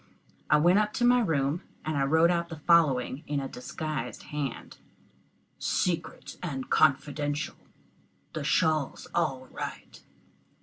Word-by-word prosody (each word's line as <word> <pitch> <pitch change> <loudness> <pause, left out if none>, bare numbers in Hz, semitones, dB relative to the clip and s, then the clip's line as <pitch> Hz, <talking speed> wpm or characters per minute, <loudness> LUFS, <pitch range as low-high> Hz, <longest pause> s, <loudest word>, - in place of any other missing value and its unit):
I 150 - +6
went 175 +6 +5
up 210 0 0
to 240 - +1
my 245 +1 +6
room, 155 - 0 0.2
and 140 -3 0
wrote 165 +2 +5
out 170 -1 -1
the 165 - -6
following 145 -5 +3
in 145 -1 -1
a 135 - -3
disguised 125 -1 -5
hand: 140 -5 -4 0.8
"Secrit 170 -2 -2
and 135 -7 -5
konfidenshal 145 +2 +1 0.8
the - - -3
shawl's 155 -3 +1
all 135 -6 0
right." - - -7
155 Hz, 125 wpm, -28 LUFS, 140-170 Hz, 0.8 s, I